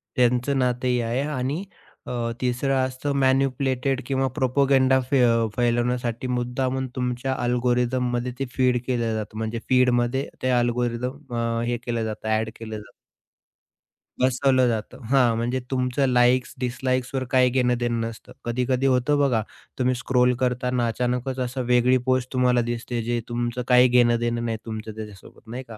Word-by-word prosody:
त्यांचं 125 Hz, +2 st, +2 dB
नातंही 125 Hz, 0 st, +1 dB
आहे 120 Hz, +3 st, -1 dB
आणि 145 Hz, +3 st, -2 dB, 0.4 s
अ, -, -, -6 dB, 0.3 s
तिसर 125 Hz, +2 st, 0 dB
असतं 130 Hz, +1 st, -1 dB
मॅनिपुलेटेड 135 Hz, 0 st, +1 dB
किंवा 135 Hz, -1 st, 0 dB
प्रोपगंडा 130 Hz, 0 st, +3 dB, 0.6 s
फैलवण्यासाठी 120 Hz, 0 st, 0 dB
मुद्दामून 125 Hz, +1 st, -1 dB
तुमच्या 125 Hz, +1 st, -2 dB
अल्गोरिथम 125 Hz, +1 st, +1 dB
मध्ये 120 Hz, +1 st, -1 dB
ते 135 Hz, -, -1 dB
फीड 125 Hz, -2 st, +2 dB
केलं 120 Hz, -3 st, 0 dB
जातं. 110 Hz, 0 st, -5 dB
म्हणजे 110 Hz, +1 st, -3 dB
फीडमध्ये 125 Hz, +1 st, +2 dB
ते 130 Hz, -, 0 dB
अल्गोरिथम 120 Hz, +2 st, -2 dB
अ, 115 Hz, 0 st, -1 dB
हे 120 Hz, -, 0 dB
केलं 115 Hz, -2 st, -1 dB
जातं 110 Hz, 0 st, -5 dB
ॲड 110 Hz, 0 st, +1 dB
केलं 110 Hz, -1 st, -7 dB
जातं 105 Hz, -, -12 dB, 1.3 s
बसवलं 130 Hz, 0 st, +3 dB
जातं. 110 Hz, -3 st, -3 dB
हां 125 Hz, -4 st, +4 dB
म्हणजे 120 Hz, +3 st, -1 dB
तुमचं 130 Hz, +1 st, +1 dB
लाइक्स 125 Hz, 0 st, +3 dB
डिसलाइक्सवर 130 Hz, +1 st, -1 dB
काही 130 Hz, -1 st, +4 dB
घेणं-देणं 120 Hz, -2 st, +1 dB
नसतं. 115 Hz, -2 st, -10 dB
कधी-कधी 125 Hz, +2 st, 0 dB
होतं 135 Hz, +2 st, +2 dB
बघा, 130 Hz, -6 st, +2 dB, 0.4 s
तुम्ही 130 Hz, 0 st, +2 dB
स्क्रोल 125 Hz, 0 st, +2 dB
करतांना 125 Hz, -1 st, 0 dB
अचानकच 125 Hz, +2 st, -2 dB
असं 130 Hz, +1 st, -2 dB
वेगळी 125 Hz, +1 st, +4 dB
पोस्ट 130 Hz, -1 st, 0 dB
तुम्हाला 125 Hz, -1 st, +3 dB
दिसते 120 Hz, 0 st, -3 dB
जे 120 Hz, +1 st, -1 dB
तुमचं 120 Hz, +1 st, -2 dB
काही 125 Hz, 0 st, +6 dB
घेणं-देणं 120 Hz, -1 st, +2 dB
नाही 115 Hz, -1 st, -2 dB
तुमचं 110 Hz, -1 st, -6 dB
त्याच्यासोबत 105 Hz, -3 st, -10 dB
नाही 125 Hz, +3 st, -6 dB
का? 115 Hz, -, -10 dB
125 Hz, 140 wpm, -24 LUFS, 120-130 Hz, 1.3 s, काही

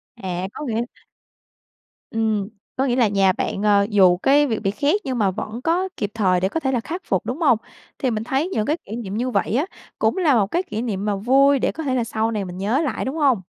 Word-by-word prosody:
À, 185 Hz, -4 st, -4 dB
có -, -, -6 dB
nghĩa 230 Hz, -1 st, 0 dB, 1.3 s
Ừm. 220 Hz, -3 st, 0 dB, 0.3 s
Có 265 Hz, -, +1 dB
nghĩa 245 Hz, -3 st, +1 dB
là 245 Hz, -3 st, +4 dB
nhà 195 Hz, -2 st, +3 dB
bạn, 195 Hz, -, -3 dB
ờ, 205 Hz, -1 st, +4 dB
dù 190 Hz, -4 st, +5 dB
cái 285 Hz, +9 st, +4 dB
việc 225 Hz, -4 st, -1 dB
bị 195 Hz, -2 st, 0 dB
khét 285 Hz, -, +1 dB
nhưng 260 Hz, -2 st, -2 dB
mà 200 Hz, -4 st, +2 dB
vẫn 215 Hz, +5 st, -6 dB
có 350 Hz, +6 st, +1 dB
kịp 205 Hz, -, -2 dB
thời 185 Hz, -5 st, +2 dB
để 190 Hz, +1 st, 0 dB
có 325 Hz, -, -2 dB
thể 265 Hz, -4 st, -1 dB
là 250 Hz, -, +1 dB
khắc 330 Hz, +10 st, -5 dB
phục, 190 Hz, -, 0 dB
đúng 265 Hz, +8 st, -4 dB
hông? 260 Hz, -8 st, +5 dB, 0.4 s
Thì 260 Hz, -, 0 dB
mình 215 Hz, -1 st, -2 dB
thấy 270 Hz, +7 st, 0 dB
những 215 Hz, -, -1 dB
cái 305 Hz, +6 st, 0 dB
kỷ 210 Hz, -, -6 dB
niệm 210 Hz, -4 st, -5 dB
như 250 Hz, +2 st, -1 dB
vậy 235 Hz, -, 0 dB
á 285 Hz, +6 st, +2 dB, 0.3 s
cũng -, -, +1 dB
là 320 Hz, -8 st, +3 dB
một 205 Hz, -4 st, +3 dB
cái 350 Hz, -, +1 dB
kỷ 220 Hz, -, -4 dB
niệm 205 Hz, -5 st, -3 dB
mà 205 Hz, -1 st, 0 dB
vui 270 Hz, +7 st, +4 dB
để -, -, +1 dB
có 320 Hz, -, -6 dB
thể 265 Hz, -3 st, 0 dB
là 245 Hz, -, +1 dB
sau 225 Hz, 0 st, -1 dB
này 210 Hz, -3 st, -2 dB
mình 180 Hz, -1 st, -7 dB
nhớ 215 Hz, +9 st, +1 dB
lại, 300 Hz, -, -2 dB
đúng 265 Hz, +3 st, -3 dB
hông? 275 Hz, -10 st, +2 dB
230 Hz, 255 wpm, -22 LUFS, 200-275 Hz, 1.3 s, dù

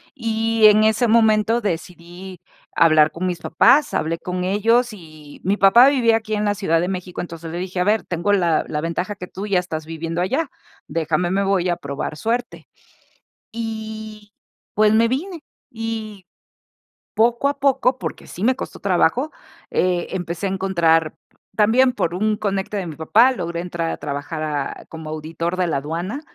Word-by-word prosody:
Y 225 Hz, -2 st, +1 dB
en 215 Hz, 0 st, +5 dB
ese 220 Hz, +3 st, +2 dB
momento 220 Hz, 0 st, +3 dB
decidí 175 Hz, -1 st, -6 dB, 0.4 s
hablar 155 Hz, -2 st, +5 dB
con 180 Hz, +2 st, -3 dB
mis 175 Hz, -2 st, -3 dB
papás, 285 Hz, -, +3 dB
hablé 165 Hz, +2 st, -1 dB
con 180 Hz, 0 st, -4 dB
ellos 230 Hz, +5 st, +2 dB
y 155 Hz, -5 st, -13 dB
mi 195 Hz, +3 st, +1 dB
papá 235 Hz, +7 st, +7 dB
vivía 235 Hz, -5 st, +3 dB
aquí 220 Hz, -1 st, -6 dB
en 210 Hz, 0 st, -1 dB
la 205 Hz, 0 st, +1 dB
Ciudad 175 Hz, -5 st, +1 dB
de 175 Hz, -, -1 dB
México, 185 Hz, -1 st, -5 dB
entonces, 165 Hz, -2 st, -8 dB
le 170 Hz, -, -5 dB
dije: 185 Hz, 0 st, -4 dB
"A -, -, +3 dB
ver, 210 Hz, +3 st, +2 dB
tengo 180 Hz, +4 st, -1 dB
la 170 Hz, -5 st, +2 dB
la 150 Hz, -, -3 dB
ventaja 180 Hz, +5 st, -3 dB
que 180 Hz, -3 st, -8 dB
tú 195 Hz, +3 st, -7 dB
ya 195 Hz, -3 st, +2 dB
estás 160 Hz, -3 st, -5 dB
viviendo 165 Hz, +1 st, -4 dB
allá, 270 Hz, -, -1 dB, 0.4 s
déjame, 165 Hz, +2 st, -1 dB
me 200 Hz, +1 st, +1 dB
voy 195 Hz, -2 st, +1 dB
a 175 Hz, -, +1 dB
probar 140 Hz, -1 st, -5 dB
suerte". 235 Hz, +6 st, -3 dB, 0.8 s
Y, 220 Hz, -2 st, -7 dB, 0.4 s
pues, 215 Hz, 0 st, +4 dB
me 230 Hz, +1 st, +4 dB
vine 330 Hz, +9 st, -3 dB, 0.3 s
y 220 Hz, -4 st, -6 dB, 0.9 s
poco 235 Hz, +4 st, +2 dB
a 280 Hz, 0 st, -2 dB
poco, 265 Hz, -2 st, +2 dB
porque -, -, -6 dB
sí 185 Hz, -, -8 dB
me 255 Hz, +2 st, +3 dB
costó -, -, -7 dB
trabajo, 200 Hz, -, +1 dB, 0.4 s
eh, 180 Hz, -1 st, 0 dB
empecé 175 Hz, 0 st, -3 dB
a -, -, -2 dB
encontrar 170 Hz, -4 st, +1 dB, 0.4 s
también 235 Hz, +5 st, +4 dB
por 170 Hz, -7 st, -1 dB
un 215 Hz, +2 st, 0 dB
conecte 195 Hz, 0 st, -2 dB
de 185 Hz, -3 st, -3 dB
mi 155 Hz, -, -7 dB
papá, 220 Hz, -, +4 dB
logré 170 Hz, -6 st, -4 dB
entrar 170 Hz, -2 st, -3 dB
a -, -, -4 dB
trabajar 145 Hz, +3 st, -5 dB
a 145 Hz, -3 st, -4 dB
como 160 Hz, -1 st, -8 dB
auditor 165 Hz, +3 st, -4 dB
de 185 Hz, -1 st, 0 dB
la 160 Hz, -, 0 dB
aduana, 170 Hz, -, -4 dB
190 Hz, 175 wpm, -21 LUFS, 170-220 Hz, 0.9 s, papá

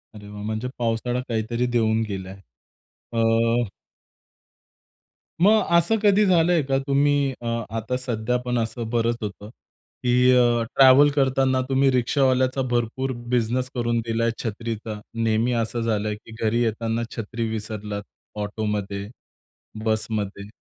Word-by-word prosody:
अरे 105 Hz, -1 st, -11 dB
वा! 105 Hz, 0 st, -8 dB
म्हणजे 110 Hz, +3 st, -3 dB
पावसाळा 120 Hz, +1 st, -1 dB
काहीतरी 115 Hz, +2 st, -1 dB
देऊन 110 Hz, -1 st, +2 dB
गेलाय. 95 Hz, -1 st, -5 dB, 0.8 s
अ 115 Hz, 0 st, +2 dB, 1.7 s
मग 215 Hz, +3 st, +6 dB, 0.2 s
असं 195 Hz, +7 st, +2 dB
कधी 205 Hz, +1 st, +5 dB
झालंय 175 Hz, -3 st, +4 dB
का? 135 Hz, 0 st, 0 dB
तुम्ही 140 Hz, 0 st, +2 dB
अ, -, -, -8 dB, 0.3 s
आता 115 Hz, +3 st, -2 dB
सध्या 125 Hz, -1 st, -1 dB
पण 125 Hz, -1 st, 0 dB
असं 115 Hz, 0 st, -3 dB
बरंच 115 Hz, 0 st, +1 dB
होतं 105 Hz, 0 st, -6 dB, 0.5 s
की 125 Hz, +1 st, +4 dB
अ, 120 Hz, -1 st, +3 dB
ट्रॅव्हल 135 Hz, +2 st, +7 dB
करताना 130 Hz, -1 st, +2 dB
तुम्ही 135 Hz, 0 st, +3 dB
रिक्षावाल्याचा 130 Hz, +1 st, +2 dB
भरपूर 120 Hz, +3 st, -1 dB, 0.2 s
बिझनेस 125 Hz, +2 st, +1 dB
करून 120 Hz, -1 st, 0 dB
दिलाय, 115 Hz, 0 st, 0 dB
छत्रीचा? 110 Hz, -1 st, -4 dB
नेहमी 115 Hz, +1 st, +1 dB
असं 115 Hz, +1 st, -3 dB
झालंय 105 Hz, -2 st, -1 dB
की 110 Hz, +1 st, -16 dB
घरी 115 Hz, +2 st, +2 dB
येताना 115 Hz, +1 st, -1 dB
छत्री 115 Hz, +1 st, -3 dB
विसरलात 105 Hz, -1 st, -5 dB, 0.4 s
ऑटोमध्ये 105 Hz, -1 st, -3 dB, 0.8 s
बसमध्ये, 105 Hz, -2 st, -2 dB
115 Hz, 120 wpm, -23 LUFS, 110-130 Hz, 1.7 s, ट्रॅव्हल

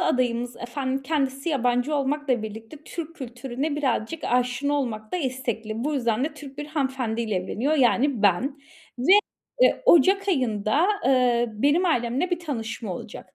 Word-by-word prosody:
adayımız 245 Hz, -1 st, 0 dB
efendim, 260 Hz, +2 st, -3 dB
kendisi 275 Hz, 0 st, -1 dB
yabancı 250 Hz, 0 st, +1 dB
olmakla 280 Hz, -3 st, 0 dB
birlikte 220 Hz, +5 st, -8 dB
Türk 330 Hz, -1 st, -6 dB
kültürüne 260 Hz, +3 st, -4 dB
birazcık 280 Hz, +1 st, -1 dB
aşina 250 Hz, +3 st, +1 dB
olmakta 230 Hz, -2 st, -2 dB
istekli. 245 Hz, -, -3 dB
Bu 300 Hz, +1 st, 0 dB
yüzden 240 Hz, -2 st, +1 dB
de -, -, 0 dB
Türk 280 Hz, -2 st, -11 dB
bir 295 Hz, -, -4 dB
hanımefendi 265 Hz, -6 st, -2 dB
ile 220 Hz, -3 st, -1 dB
evleniyor 210 Hz, +11 st, -1 dB
yani, 260 Hz, -3 st, +2 dB
ben. 230 Hz, +9 st, +2 dB, 0.4 s
Ve, 260 Hz, +10 st, +4 dB, 0.5 s
eee, -, -, +4 dB
ocak 390 Hz, -, +5 dB
ayında, 255 Hz, -, +1 dB, 0.2 s
ııı, 240 Hz, -4 st, +2 dB
benim 295 Hz, +6 st, +4 dB
ailemle 260 Hz, +1 st, 0 dB
bir 355 Hz, -, 0 dB
tanışma 230 Hz, -, -4 dB
olacak. -, -, -10 dB
260 Hz, 145 wpm, -25 LUFS, 235-290 Hz, 0.5 s, ocak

